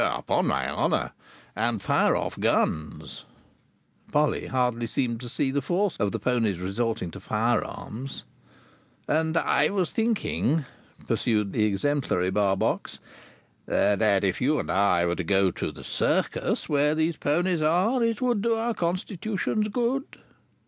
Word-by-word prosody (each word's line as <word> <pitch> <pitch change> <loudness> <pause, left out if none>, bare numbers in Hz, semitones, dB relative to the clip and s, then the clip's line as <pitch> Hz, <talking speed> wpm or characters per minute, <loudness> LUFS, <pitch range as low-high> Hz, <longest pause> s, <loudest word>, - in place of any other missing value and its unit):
"Upon - - 0
my - - 0
honour.—And 115 +2 -2
fire 100 - +2
off - - -3
guns." 75 -1 -1 0.9
(Polly 150 +1 +1
hardly 125 -2 0
seemed 120 -1 -1
to 120 - -6
see 135 +3 0
the 140 +1 0
force 180 +7 0
of 105 -2 0
the - - -2
ponies 115 -7 0
resorting 95 +1 -2
to - - -9
fire 110 +2 +1
arms.) 130 +5 -7 0.8
"And 160 +1 +1
I 150 -2 +2
was 190 -4 -1
thinking," 210 - 0 0.4
pursued 105 -3 +1
the 110 - +2
exemplary 100 -4 0
Barbox, 95 -1 0 0.7
"that 100 -1 +2
if 95 -2 0
you 145 +4 +2
and - - -2
I 95 -3 +3
were 85 0 0
to 90 - -2
go 95 +1 +2
to - - -4
the - - -11
Circus - - 0
where 150 +1 +2
these 160 0 0
ponies 175 +3 +1
are, 185 +11 +2
it 230 0 0
would 240 -5 +1
do 230 +1 +2
our 230 +1 -1
constitutions 195 +4 -2
good." 245 +5 -2
135 Hz, 140 wpm, -26 LUFS, -, 0.9 s, I